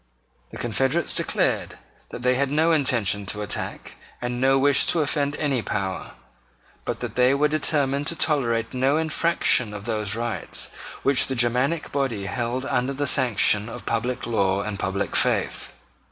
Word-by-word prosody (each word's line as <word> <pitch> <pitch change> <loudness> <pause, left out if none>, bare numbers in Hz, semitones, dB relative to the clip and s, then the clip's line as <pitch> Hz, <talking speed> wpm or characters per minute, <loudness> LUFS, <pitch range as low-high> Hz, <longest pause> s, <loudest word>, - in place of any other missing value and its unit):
The - - -10
confederates 135 +7 0
declared - - -1 0.3
that - - -8
they 125 0 +3
had 135 +1 0
no 155 +4 +2
intention 115 - +1
to 105 +3 -2
attack 100 - -5 0.2
and 125 0 -4
no 135 +1 +4
wish 140 0 +4
to 170 - +2
offend 145 -1 0
any 140 -6 -1
power, 95 -3 -4 0.7
but - - -4
that - - -4
they 125 +2 +3
were 150 +2 +3
determined 145 -2 0
to 170 - -1
tolerate 115 -8 0
no 135 +3 +2
infraction 160 -8 +1
of 100 0 -8
those 110 -4 -1
rights 115 0 -2 0.3
which 140 -1 +3
the 130 - -3
Germanic 125 +6 0
body 130 -8 -2
held 120 +4 -3
under 125 +2 -1
the 145 +1 -2
sanction 115 -5 +3
of 120 +1 -9
public 120 +2 -2
law 100 -4 0
and 105 -2 -5
public 95 +1 -2
faith. - - 0
125 Hz, 160 wpm, -24 LUFS, 115-140 Hz, 0.7 s, no